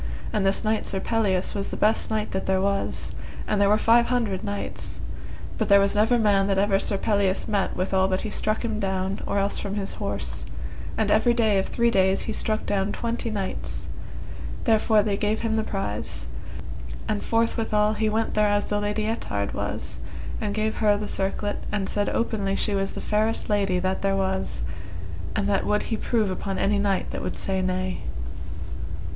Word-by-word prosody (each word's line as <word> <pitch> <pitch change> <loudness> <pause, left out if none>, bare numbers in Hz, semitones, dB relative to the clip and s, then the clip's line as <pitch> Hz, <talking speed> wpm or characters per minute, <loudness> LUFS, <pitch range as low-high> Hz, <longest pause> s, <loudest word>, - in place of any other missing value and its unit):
And 210 -3 +2
this 195 - +3
knight 215 0 0
Sir 195 - +1
Pelleas 195 -4 +1
was 200 -1 -2
the - - -4
best 215 +1 +2
knight 215 -1 -1
that 190 - -2
was 195 +1 0
there, - - -10 0.3
and 210 -1 +1
there 200 - +5
were 210 - +5
five 235 +2 +5
hundred 230 -6 0
knights, 205 -1 -4 0.6
but - - 0
there 200 0 +8
was 200 0 +3
never 220 +4 +4
man 200 -3 +3
that 195 -1 +2
ever 195 0 +3
Sir 200 - +2
Pelleas 200 -2 +1
met 200 -2 0
withal 190 +1 +2
but 185 0 0
he 215 - -4
struck 215 +3 0
him 220 -2 -1
down, 190 -1 -1
or - - 0
else 200 0 +1
from 200 0 -3
his 200 -2 -2
horse; - - -3 0.5
and - - +2
every 240 -1 +4
day 220 -4 +3
of 190 - -1
three 235 0 +2
days 190 -2 +3
he 220 - -3
struck 215 0 0
down 200 0 +1
twenty 235 0 -2
knights, 200 -3 -4 0.7
therefore 220 -2 +4
they 205 -1 +1
gave 210 +1 0
him 225 -1 0
the 220 - +1
prize, 110 - -3 0.8
and 210 - 0
forthwithal 225 -2 +2
he 220 0 +1
went 220 +1 0
thereas 205 -1 +3
the 205 - 0
Lady 210 +1 0
Ettard 105 - -2
was, - - -3 0.4
and 205 -1 -1
gave 215 0 0
her 210 -2 +4
the 210 0 -3
circlet, 205 +2 -1
and 205 -2 0
said 205 -1 0
openly 200 -4 0
she 205 - 0
was 195 0 0
the - - -5
fairest 215 +1 +1
lady 195 -3 +2
that 185 +1 0
there 195 0 +2
was, 190 - -1 0.7
and 205 -2 +1
that 200 -1 +2
would 210 0 +1
he 225 - -1
prove 215 -2 +1
upon 195 +1 -3
any 200 0 +2
knight 200 -2 +1
that - - -4
would - - -3
say 190 -1 -1
nay. 185 0 -1
205 Hz, 190 wpm, -25 LUFS, 195-215 Hz, 0.8 s, there